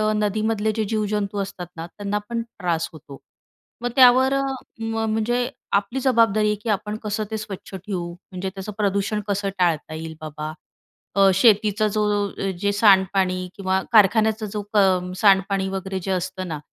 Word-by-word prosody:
नदीमधले 215 +1 0
जे 220 - +1
जीवजंतू 210 -1 -1
असतात 190 -3 -6
ना, 165 - -5
त्यांना 205 +3 -3
पण 235 -1 -1
त्रास 175 -7 -3
होतो. 145 -3 -12 0.6
मग 245 - -1
त्यावर, 260 +1 +6 0.5
म 225 0 -2
म्हणजे 240 +3 0 0.3
आपली 240 +6 -5
जबाबदारी 225 -5 +3
आहे, 210 - +2
की 230 - -3
आपण 210 +1 -1
कसं 210 +1 -2
ते 220 - -1
स्वच्छ 205 -2 -8
ठेवू, 185 -2 -4
म्हणजे 185 +1 -7
त्याचं 195 +2 -6
प्रदूषण 200 +1 0
कसं 200 0 -1
टाळता 160 -3 +1
येईल 160 0 -6
बाबा. 155 0 -5 0.6
अ, 195 -1 +6
शेतीचा 215 0 +4
जो, 205 -1 0 0.2
जे 200 +3 -1
सांडपाणी 190 -3 +3
किंवा 190 -1 0
कारखान्याचा 220 0 +4
जो 210 - -2
क 185 -3 +3
सांडपाणी 195 -1 +3
वगैरे, 190 0 -4
जे 190 +2 -4
असतं 185 0 -3
ना, 155 -3 -4
200 Hz, 155 wpm, -23 LUFS, 185-215 Hz, 0.6 s, त्यावर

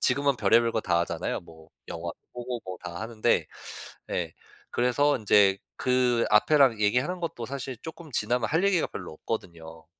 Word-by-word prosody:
지금은 140 -1 +2
별의별 115 -1 +4
거 110 - 0
다 85 - +2
하잖아요. 85 - -2
뭐 80 -1 -16 0.2
영화도 85 0 -6 0.2
보고 120 -1 -4
뭐 95 - -5
다 85 0 -6
하는데 110 0 +1 0.6
예 - - -2 0.4
그래서 130 +4 +2
인제 100 -3 +5 0.2
그 125 -2 +2
앞에랑 125 +1 +5
얘기하는 125 - +1
것도 160 -8 -4
사실 135 -1 -5
쪼끔 160 -1 -9
지나면 120 +2 0
할 165 +5 +1
얘기가 195 -4 +3
별로 90 -4 -7
없거든요. 80 -4 -6
120 Hz, 335 characters per minute, -27 LUFS, 95-135 Hz, 0.6 s, 인제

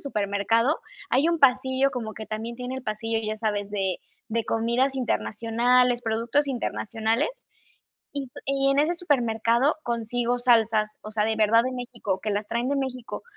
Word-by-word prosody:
supermercado, 225 - +1 0.3
hay 275 +6 +3
un 335 - +1
pasillo 260 +1 +4
como 225 -3 -4
que 220 - -7
también 225 +2 -5
tiene 250 +1 -5
el 260 - -6
pasillo, 225 0 -2
¿ya 215 0 -2
sabes?, 205 -2 -2
de 195 -3 -1 0.3
de 230 0 0
comidas 235 +4 +1
internacionales, 245 0 +2
productos 230 +6 +1
internacionales, 230 - -1 0.8
y 275 -3 -5 0.4
en 275 - +2
ese 310 +4 +3
supermercado 245 -4 +2
consigo 240 0 -1
salsas, 225 -3 +3
o 215 - -8
sea, 210 -1 +1
de 220 0 +1
verdad 220 +2 +4
de 255 - -2
México, 235 -6 -4
que 215 - -2
las 205 +1 -1
traen 235 +2 -1
de 285 - +1
México, 255 -3 -4
235 Hz, 155 wpm, -25 LUFS, 220-255 Hz, 0.8 s, pasillo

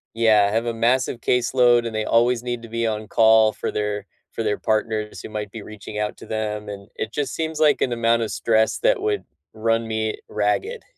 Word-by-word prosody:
Yeah, 110 -3 +4
have 115 +2 0
a 115 - -1
massive 120 +1 +1
caseload, 120 -1 +3
and 115 - -4
they 110 - 0
always 120 +2 +2
need 120 -1 -3
to 115 - -10
be 115 0 -1
on 110 -1 -2
call 110 -1 +5
for - - -4
their 105 -1 -2 0.3
for 115 - -3
their 105 -1 0
partners 110 -1 -1
who - - -8
might 105 -2 -5
be 115 - -8
reaching 105 0 -9
out 105 - -2
to - - -12
them, 105 -1 -3
and 100 0 -9
it 110 - -4
just 140 -3 -2
seems 160 -1 -3
like 150 -2 +4
an 125 - +1
amount 115 0 +2
of 110 - -2
stress 110 -1 +1
that - - +2
would 420 0 -1 0.3
run 115 +1 0
me 110 -1 -2
ragged. 255 - -1
115 Hz, 215 wpm, -22 LUFS, 110-120 Hz, 0.3 s, call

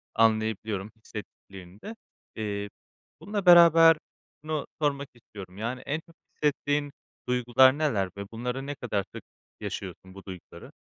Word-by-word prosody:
anlayabiliyorum, 110 -2 +1
hissettiklerini 100 -3 -11
de. 225 - -7 0.4
Eee, 105 -1 -3 0.5
bununla 205 -2 -3
beraber 165 -2 +8 0.5
şunu 155 -2 -2 0.2
sormak 140 -1 0
istiyorum, 100 -5 -12
yani, 120 +4 -3
en 150 +3 -1
çok 165 - -20 0.2
hissettiğin 145 -1 0 0.4
duygular 125 +2 +5
neler 110 -12 0
ve 100 - -5
bunları 125 +4 -4
ne 145 - -4
kadar 100 -6 -2
sık - - -7 0.4
yaşıyorsun, 95 0 -7
bu 100 0 -12
duyguları? 95 -3 -11
120 Hz, 125 wpm, -27 LUFS, 100-145 Hz, 0.5 s, beraber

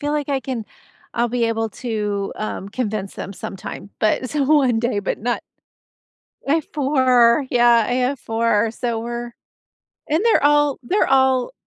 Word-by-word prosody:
feel 290 0 -2
like 295 -1 -2
I 275 -1 0
can 250 -5 -4 0.5
I'll 235 +1 +2
be 240 0 0
able 225 -1 -1
to, 210 -4 -3
um, 215 -2 -4
convince 210 -3 -3
them 195 - -6
sometime, 195 +1 -8
but 230 +4 +1
so, 295 -2 -1
one 270 -5 +3
day, 235 -3 0
but 200 - -2
not 240 +2 -2 1.1
I 285 - +4
have 320 -2 -1
4, 260 -3 +3
yeah, 240 -2 +5
I - - -2
have 255 +2 0
4. 225 -1 +1
So 235 -1 -2
we're 240 +1 -5 0.8
and 310 +3 +2
they're 460 - +4
all 295 -1 +3
they're 370 +12 +1
all 265 - +3
240 Hz, 165 wpm, -21 LUFS, 225-270 Hz, 1.1 s, yeah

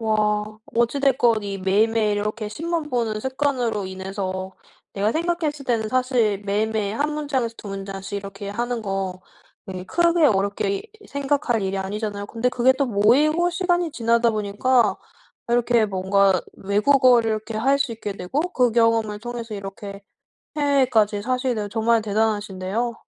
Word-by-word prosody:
와. 220 -1 +1 0.6
어찌 235 +4 +2
됐건 245 -5 +3
이 200 -1 -4
매일매일 210 +2 +2
이렇게 210 +1 -3
신문 325 +6 -3
보는 230 -4 -1
습관으로 255 -4 -1
인해서 190 0 -5 0.4
내가 205 +2 0
생각했을 320 -3 -1
때는 225 -3 0
사실 250 -5 +1
매일매일 210 +1 -1
1 300 +1 0
문장에서 270 -6 -2
2 - - -10
문장씩 195 0 -6
이렇게 200 0 -8
하는 240 +3 -2
거 195 -2 -3 0.5
예 185 -1 -6
크게 340 - +2
어렵게 200 -3 +1 0.3
생각할 275 -5 0
일이 195 0 -2
아니잖아요. 205 +1 -3
근데 230 +4 -1
그게 250 +1 +3
또 270 +1 -1
모이고 285 +11 +3
시간이 350 -2 0
지나다 235 0 +2
보니까 215 +3 +1 0.5
이렇게 235 -1 +3
뭔가 195 -1 +2 0.2
외국어를 235 +3 +4
이렇게 215 +1 -4
할 275 +4 +3
수 275 -4 0
있게 215 -2 -5
되고 190 +10 -2
그 250 -3 +3
경험을 230 -2 +2
통해서 235 0 -6
이렇게 200 0 -8 0.5
해외까지 250 -8 +2
사시게 255 0 0
되고 210 -1 -3
정말 225 +1 +2
대단하신데요. 210 +1 -1
225 Hz, 335 characters per minute, -23 LUFS, 200-255 Hz, 0.6 s, 외국어를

